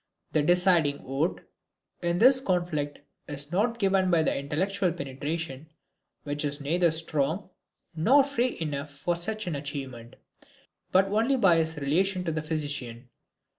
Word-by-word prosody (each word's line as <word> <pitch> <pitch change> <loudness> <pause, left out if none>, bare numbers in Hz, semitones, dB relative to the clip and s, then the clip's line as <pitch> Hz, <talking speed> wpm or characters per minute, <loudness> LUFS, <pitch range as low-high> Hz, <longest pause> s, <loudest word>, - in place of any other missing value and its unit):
The 155 - +2
deciding 175 -3 +3
vote 135 +6 -2 0.5
in 170 0 0
this 255 +6 +6
conflict 175 - -1 0.3
is 145 +1 -4
not 225 +6 +1
given 195 -3 +2
by 170 -3 +3
his - - +2
intellectual 180 +7 -1
penetration 150 0 -5 0.5
which 145 0 -3
is 145 0 -1
neither 170 +5 +2
strong 160 +3 -1 0.4
nor 255 - +5
free 255 -3 -1
enough 150 -2 -3
for 145 +5 -2
such 215 +5 -3
an 175 - -3
achievement 135 -5 -6 0.8
but 190 +1 +5
only 220 +7 +1
by 190 -9 +4
his 160 -1 0
relation 180 +7 0
to 165 - -2
the 155 0 -2
physician. 145 -6 -4
165 Hz, 140 wpm, -27 LUFS, 145-185 Hz, 0.8 s, this